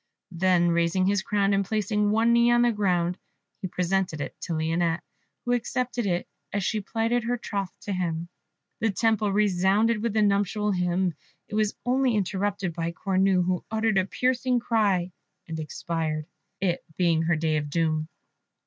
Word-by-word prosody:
Then 175 0 +3
raising 170 +2 +2
his 200 0 +2
crown, 200 0 +1
and 200 0 +2
placing 210 0 0
one 225 +2 +3
knee 235 0 +5
on 240 0 +4
the 240 - +4
ground, 180 -4 0 0.4
he 190 - -2
presented 180 -2 -1
it 140 - -5
to 170 - -3
Lionette, 165 +1 0 0.4
who 245 - 0
accepted 245 -1 -1
it 175 -1 -1 0.2
as 200 -1 -1
she 215 +3 0
plighted 230 +3 -1
her 245 +1 0
troth 200 -5 -3
to 205 - -4
him. 170 -2 -2 0.5
The 225 - +1
Temple 215 0 +1
resounded 205 +2 +2
with 230 -2 -1
the 215 -1 +3
nuptial 205 +1 +1
hymn. 180 -1 0 0.3
It - - -12
was 215 -1 +1
only 255 -1 +2
interrupted 200 -2 -1
by 170 0 -3
Cornue, 190 -1 +2
who 180 -1 -1
uttered 220 -2 +2
a 185 - +1
piercing 250 +2 +1
cry, 200 -6 +1 0.4
and 160 -1 -5
expired, 155 0 -3 0.3
it 180 -3 0
being 170 -3 +3
her 165 +1 +2
day 155 -1 0
of 150 -1 -3
doom. 155 0 0
195 Hz, 165 wpm, -26 LUFS, 175-215 Hz, 0.5 s, knee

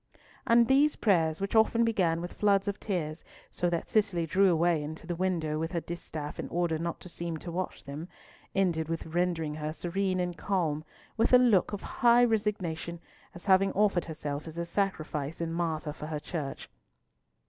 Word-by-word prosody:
And 235 0 +6
these 285 +3 +4
prayers, 165 -7 +2
which 195 0 -3
often 225 +1 +4
began 175 -7 +1
with 175 - -6
floods 200 -1 +2
of 200 0 -2
tears, 165 -6 -3 0.3
so 175 - 0
that 170 -1 -2
Cicely 200 -6 +1
drew 190 +4 +4
away 170 -1 +2
into 155 +3 -7
the 175 0 -3
window 165 -4 -1
with 165 +1 -2
her 170 - +1
distaff 160 -3 -6
in - - -4
order 170 -2 0
not 170 0 -3
to - - -9
seem 170 -1 -4
to 170 +2 -7
watch 185 +2 -4
them, 145 +4 -7 0.5
ended 170 -5 +1
with 165 0 -3
rendering 165 -2 -1
her 150 0 -3
serene 185 +3 -1
and 180 -1 -1
calm, 165 -6 -1 0.3
with 225 +3 +2
a - - +11
look 235 -7 +4
of 205 - -5
high 240 -1 +4
resignation, 185 -7 -1 0.4
as 175 - -9
having 195 0 +4
offered 200 -3 +2
herself 150 -2 -5
as 160 +1 -8
a 170 - -2
sacrifice 160 -6 -2
and 165 -1 -2
martyr 160 -3 -2
for 150 - -7
her 155 -1 -3
Church. 150 -3 -5
175 Hz, 185 wpm, -29 LUFS, 160-195 Hz, 0.5 s, a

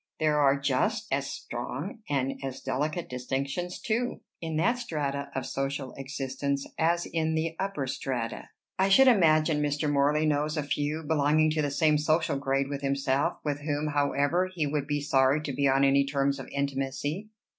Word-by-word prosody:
There 155 -1 +2
are 140 -1 +4
just 205 - 0
as 135 0 0
strong 140 - -5
and 135 -2 -1
as 135 -1 -5
delicate 155 +5 -2
distinctions 135 +8 -3
too, 235 +2 -1 0.2
in 160 -2 -3
that 235 +10 +2
stratum 140 - -3
of 135 - -2
social 135 -1 -3
existence 135 0 -3
as 170 +2 +2
in 160 -1 -1
the 160 0 -1
upper 190 -8 -2
strata. 125 -3 -4 0.3
I 190 +1 +3
should 265 +7 +7
imagine 155 -8 +4
Mr. 145 +1 0
Morley 145 +2 +2
knows 150 +1 0
a 150 - 0
few, 145 +2 -2
belonging 155 0 +3
to 155 0 0
the 145 - 0
same 150 +1 +3
social 155 -1 +1
grade 135 0 0
with 140 0 -4
himself, 140 0 0
with 145 -1 -1
whom, 150 0 -1
however, 145 +5 +1
he 170 -5 -1
would 145 -1 -2
be 145 -1 -1
sorry 135 0 +3
to 140 - -3
be 140 +2 +2
on 135 +1 +3
any 140 0 +5
terms 140 0 0
of 135 - -7
intimacy." 140 +7 -3
145 Hz, 175 wpm, -28 LUFS, 140-155 Hz, 0.3 s, should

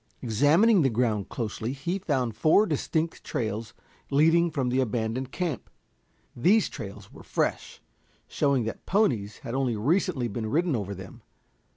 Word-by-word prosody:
Examining 155 - +4
the 135 - +3
ground 110 -4 0
closely 115 +1 -3
he 170 +8 -3
found 130 - -1
four 160 - +4
distinct 160 -1 -2
trails 110 -1 -3 0.3
leading 165 +4 +4
from 140 -6 -1
the 130 +2 +1
abandoned 120 +1 -1
camp. 170 - -3 0.7
These 190 - +3
trails 100 -4 -9
were - - -12
fresh, - - -2 0.4
showing 140 -4 +1
that 110 - -6
ponies 120 - +1
had 115 - -4
only 130 -3 0
recently 140 - +1
been 110 0 -4
ridden 165 +3 +1
over 100 -3 -3
them. 95 0 -11
130 Hz, 145 wpm, -27 LUFS, 110-160 Hz, 0.7 s, Examining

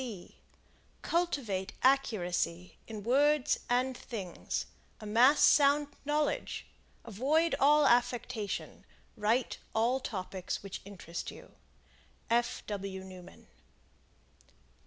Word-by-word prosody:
Cultivate 265 - -1
accuracy 180 -10 +1
in 215 -2 -7
words 285 +4 +3
and 250 +1 +1
things; 195 -8 -5 0.3
amass 235 +7 +4
sound 290 0 +5 0.2
knowledge; 295 +1 -1 0.4
avoid 280 - +1
all 295 +1 +5
affectation; 240 -3 0 0.3
write 225 +4 0 0.2
all 235 +4 +2
topics 190 -6 -5
which 195 -1 -7
interest 175 -4 -7
you. - - -12 0.8
F. 240 +1 +1
W. 195 -2 -5
Newman. 185 -1 -12
235 Hz, 85 wpm, -31 LUFS, 195-275 Hz, 0.8 s, sound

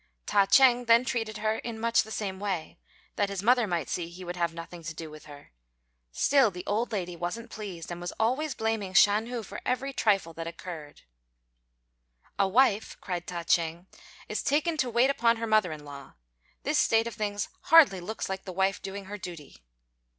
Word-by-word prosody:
Ta 200 -1 +3
ch'êng 245 0 +5
then 230 +2 +6
treated 225 -4 -2
her 215 +1 -1
in 230 -2 -6
much 230 +1 +3
the 220 - -9
same 195 -3 -4
way, 190 -6 -4 0.4
that 205 -1 +1
his 200 -1 -4
mother 240 0 +4
might 170 -5 -1
see 170 -2 -3
he 180 +2 -10
would 175 0 -5
have 170 -1 0
nothing 170 +1 -9
to 160 0 -6
do 160 -1 -7
with 155 0 -12
her; 145 -1 -13 0.6
still 270 - +4
the 180 -1 -8
old 220 +4 -1
lady 180 -4 -3
wasn't 175 +8 -5
pleased, 185 -6 -7
and 175 0 -6
was 175 - -4
always 260 +7 0
blaming 220 -4 -2
Shan 210 +4 +5
hu 240 -2 -4
for - - -8
every 270 +2 -1
trifle 195 -9 +1
that 165 0 -6
occurred. 170 -3 -9 1.4
"A 195 - +4
wife," 220 0 +2
cried 175 -2 -4
Ta 175 -1 -4
ch'êng 170 +1 0 0.4
"is - - -2
taken 310 +4 +1
to 260 -4 +1
wait 240 +4 +3
upon 235 -3 +2
her 230 - -3
mother 215 -5 +3
in 150 -1 -8
law. 140 -1 -10 0.5
This - - +1
state 225 0 +3
of 235 - -5
things 205 -1 -3 0.2
hardly 300 - +7
looks 220 +6 -4
like 190 0 -5
the 190 - -5
wife 190 +2 0
doing 195 0 -6
her 205 +2 -7
duty." 170 -7 -9
200 Hz, 195 wpm, -28 LUFS, 175-230 Hz, 1.4 s, hardly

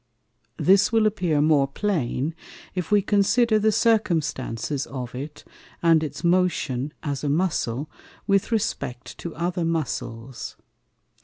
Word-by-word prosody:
This 195 +4 +4
will 225 -1 +3
appear 175 -8 +1
more 150 -2 +4
plain, 150 - -1 0.4
if 180 -3 -3
we 205 -1 +4
consider 215 +3 +3
the 215 +1 +3
Circumstances 155 - 0
of 125 -3 -6
it, 145 +4 -7 0.4
and 165 -2 +5
its 155 - -5
Motion, 170 -7 +1
as 145 -2 -3
a 145 - 0
Muscle, 150 -5 0 0.4
with 200 +2 +2
respect 140 - -2
to 170 - -6
other 175 +2 -1
Muscles. 130 -7 -3
165 Hz, 125 wpm, -24 LUFS, 140-200 Hz, 0.4 s, and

